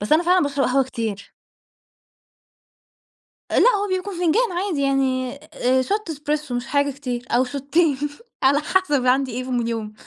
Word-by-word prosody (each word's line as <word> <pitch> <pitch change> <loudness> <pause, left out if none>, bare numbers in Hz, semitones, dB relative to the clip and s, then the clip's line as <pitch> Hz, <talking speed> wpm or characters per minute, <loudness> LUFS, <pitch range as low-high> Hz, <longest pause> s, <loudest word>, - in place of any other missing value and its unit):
بس 205 +7 -2
أنا 315 - +5
فعلًا 360 0 +3
باشرب 285 -1 0
قهوة 265 +1 +2
كتير. 220 -5 -5 2.2
آآ - - +3
لأ، - - +6
هو 410 0 -1
بيكون 370 +1 -2
فنجان 360 +7 +2
عادي 355 -4 -2
يعني 265 -2 0 0.2
آآ 260 +1 +2
shot 395 +3 -2
espresso 300 0 -3
مش 245 +2 -3
حاجة 285 0 +1
كتير 250 -3 -5
أو 240 +2 +4
شوتّين 280 +3 +1 0.5
على 280 +2 +4
حَسَب 300 -6 +1
عندي 260 0 +2
إيه 250 +2 -3
في 260 - -8
من 240 -2 0
يوم. 220 -2 -4
275 Hz, 165 wpm, -22 LUFS, 250-325 Hz, 2.2 s, لأ